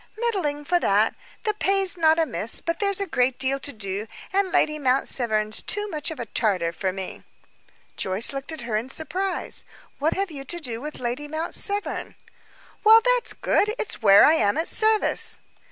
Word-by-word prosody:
"Middling, 365 Hz, -11 st, -2 dB
for 350 Hz, +3 st, +2 dB
that. 210 Hz, -5 st, +2 dB, 0.3 s
The 425 Hz, -, 0 dB
pay's 390 Hz, -2 st, +1 dB
not 320 Hz, -2 st, +3 dB
amiss, 305 Hz, -9 st, +1 dB
but 335 Hz, -, -3 dB
there's 400 Hz, -1 st, 0 dB
a 400 Hz, -, -1 dB
great 255 Hz, -7 st, 0 dB
deal 270 Hz, +1 st, 0 dB
to 285 Hz, -, -1 dB
do, 205 Hz, -2 st, -4 dB, 0.3 s
and 390 Hz, -1 st, +1 dB
Lady 305 Hz, -1 st, +1 dB
Mount 265 Hz, -1 st, +1 dB
Severn's 215 Hz, -3 st, 0 dB
too 415 Hz, 0 st, -1 dB
much 300 Hz, -2 st, -2 dB
of 320 Hz, -, -7 dB
a 240 Hz, -, -4 dB
Tartar 190 Hz, -6 st, 0 dB
for 185 Hz, +2 st, -2 dB
me." 190 Hz, 0 st, -7 dB, 0.7 s
Joyce 195 Hz, +8 st, +1 dB
looked 275 Hz, +3 st, -6 dB
at 315 Hz, -4 st, -6 dB
her 235 Hz, -2 st, -3 dB
in 225 Hz, +4 st, -2 dB
surprise. 360 Hz, +7 st, +1 dB, 0.4 s
"What 300 Hz, +3 st, 0 dB
have 390 Hz, -2 st, -2 dB
you 280 Hz, -3 st, -7 dB
to 345 Hz, +6 st, -4 dB
do 240 Hz, -7 st, -6 dB
with 300 Hz, +2 st, -7 dB
Lady 250 Hz, +4 st, -4 dB
Mount 315 Hz, +3 st, -4 dB
Severn?" 405 Hz, 0 st, -2 dB, 0.7 s
"Well, 440 Hz, +1 st, +8 dB
that's 485 Hz, -, -1 dB
good! 425 Hz, +2 st, +1 dB
It's 430 Hz, -, -4 dB
where 200 Hz, -2 st, +7 dB
I 305 Hz, -, +5 dB
am 205 Hz, -8 st, +1 dB
at 325 Hz, -, 0 dB
service." 435 Hz, -1 st, +1 dB
295 Hz, 185 wpm, -24 LUFS, 230-375 Hz, 0.7 s, Well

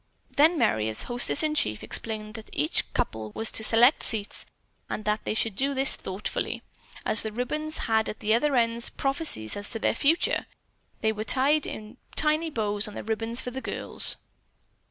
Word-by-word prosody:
Then 320 Hz, +4 st, +4 dB
Merry, 110 Hz, -, +1 dB
as 110 Hz, -, -2 dB
hostess 245 Hz, +5 st, +3 dB
in 305 Hz, -1 st, +1 dB
chief, 110 Hz, -, +1 dB
explained 215 Hz, -1 st, -2 dB
that 220 Hz, +1 st, -10 dB
each 150 Hz, +3 st, 0 dB
couple 110 Hz, -1 st, -3 dB
was 225 Hz, -, +2 dB
to 220 Hz, -, +3 dB
select 235 Hz, +5 st, +5 dB
seats 210 Hz, -3 st, 0 dB, 0.4 s
and 215 Hz, -, -5 dB
that 210 Hz, +1 st, -1 dB
they -, -, -2 dB
should 220 Hz, -2 st, 0 dB
do 275 Hz, +5 st, 0 dB
this 270 Hz, +1 st, +3 dB
thoughtfully, 190 Hz, +2 st, -4 dB, 0.4 s
as 215 Hz, -, +4 dB
the 220 Hz, -, -2 dB
ribbons 305 Hz, +7 st, -2 dB
had 220 Hz, -1 st, +2 dB
at 215 Hz, -, -7 dB
the 215 Hz, +1 st, +1 dB
other 275 Hz, +5 st, +2 dB
ends 235 Hz, -1 st, +1 dB
prophecies 275 Hz, -, 0 dB
as 205 Hz, 0 st, -3 dB
to 225 Hz, -, -1 dB
their -, -, +1 dB
future. 295 Hz, +8 st, +2 dB, 0.5 s
There 220 Hz, 0 st, +1 dB
were 215 Hz, 0 st, -4 dB
tiny 295 Hz, +4 st, 0 dB
bows 210 Hz, -6 st, -1 dB
on 210 Hz, -, -10 dB
the -, -, -6 dB
ribbons 225 Hz, +2 st, -1 dB
for 250 Hz, -, -5 dB
girls. 265 Hz, +2 st, 0 dB
225 Hz, 175 wpm, -26 LUFS, 215-275 Hz, 0.5 s, select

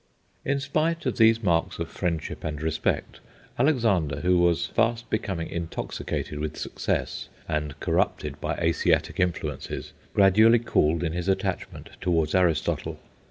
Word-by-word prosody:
In 140 Hz, +1 st, 0 dB
spite 155 Hz, +4 st, 0 dB
of 130 Hz, -, -1 dB
these 115 Hz, 0 st, +5 dB
marks 85 Hz, -3 st, +1 dB
of 85 Hz, -, -3 dB
friendship 85 Hz, -2 st, -3 dB
and 75 Hz, -1 st, -3 dB
respect, 80 Hz, 0 st, -1 dB, 0.4 s
Alexander, 105 Hz, -, +2 dB
who 90 Hz, 0 st, +3 dB
was 85 Hz, -1 st, +3 dB
fast 115 Hz, 0 st, 0 dB
becoming 95 Hz, -6 st, -2 dB
intoxicated 85 Hz, -2 st, -4 dB
with 75 Hz, 0 st, -4 dB
success, -, -, -2 dB, 0.2 s
and 75 Hz, -2 st, -2 dB
corrupted -, -, -1 dB
by -, -, -1 dB
Asiatic -, -, +1 dB
influences, 80 Hz, -5 st, -2 dB, 0.2 s
gradually 110 Hz, +4 st, +6 dB
cooled 85 Hz, -8 st, +1 dB
in 80 Hz, -2 st, -1 dB
his 90 Hz, +1 st, -3 dB
attachment 95 Hz, -, -2 dB
towards 80 Hz, -4 st, +1 dB
Aristotle. 90 Hz, -4 st, +1 dB
90 Hz, 130 wpm, -26 LUFS, 80-115 Hz, 0.4 s, gradually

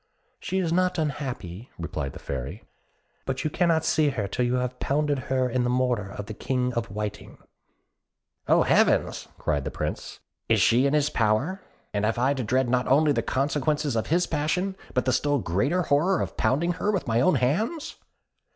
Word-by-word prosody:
"She 190 Hz, -, -3 dB
is 170 Hz, -3 st, 0 dB
not 180 Hz, 0 st, +2 dB
unhappy," 130 Hz, -, -4 dB
replied 70 Hz, -5 st, -4 dB
the -, -, -9 dB
Fairy: 65 Hz, -1 st, -5 dB, 0.6 s
"but 135 Hz, -1 st, -2 dB
you 155 Hz, -, -1 dB
cannot 165 Hz, -2 st, +2 dB
see 155 Hz, -2 st, +3 dB
her 110 Hz, -7 st, -2 dB
till 125 Hz, -, -1 dB
you 120 Hz, +1 st, +1 dB
have 125 Hz, 0 st, -2 dB
pounded 145 Hz, 0 st, 0 dB
her 130 Hz, -1 st, +2 dB
in 125 Hz, 0 st, 0 dB
the 120 Hz, -, 0 dB
mortar 125 Hz, -5 st, 0 dB
of 100 Hz, +1 st, -7 dB
the 110 Hz, -, -7 dB
King 125 Hz, +2 st, -1 dB
of 115 Hz, -1 st, -2 dB
the -, -, -12 dB
Whiting." 105 Hz, 0 st, -5 dB, 1.1 s
"Oh! -, -, +5 dB
heavens!" -, -, +2 dB
cried 75 Hz, -3 st, -1 dB
the -, -, -3 dB
Prince; -, -, -5 dB, 0.3 s
"is -, -, +4 dB
she 125 Hz, +4 st, +4 dB
in 140 Hz, -, +1 dB
his 150 Hz, -1 st, +2 dB
power; 120 Hz, -, +1 dB, 0.3 s
and 105 Hz, 0 st, -1 dB
have 110 Hz, +2 st, +1 dB
I 130 Hz, +4 st, +2 dB
to 130 Hz, -3 st, -3 dB
dread 130 Hz, +3 st, +1 dB
not 125 Hz, +1 st, +1 dB
only 145 Hz, +3 st, +4 dB
the -, -, +1 dB
consequences 145 Hz, 0 st, 0 dB
of 110 Hz, -, -1 dB
his 175 Hz, +3 st, +2 dB
passion, 175 Hz, +6 st, -1 dB, 0.2 s
but 125 Hz, -, +1 dB
the 130 Hz, -, +2 dB
still 145 Hz, +3 st, +2 dB
greater 135 Hz, -, 0 dB
horror 165 Hz, +5 st, +2 dB
of -, -, -3 dB
pounding 170 Hz, +7 st, +1 dB
her 210 Hz, -, +2 dB
with 195 Hz, -4 st, -1 dB
my 115 Hz, +1 st, +2 dB
own 170 Hz, +5 st, +4 dB
hands?" 180 Hz, -, -1 dB
130 Hz, 195 wpm, -26 LUFS, 120-155 Hz, 1.1 s, Oh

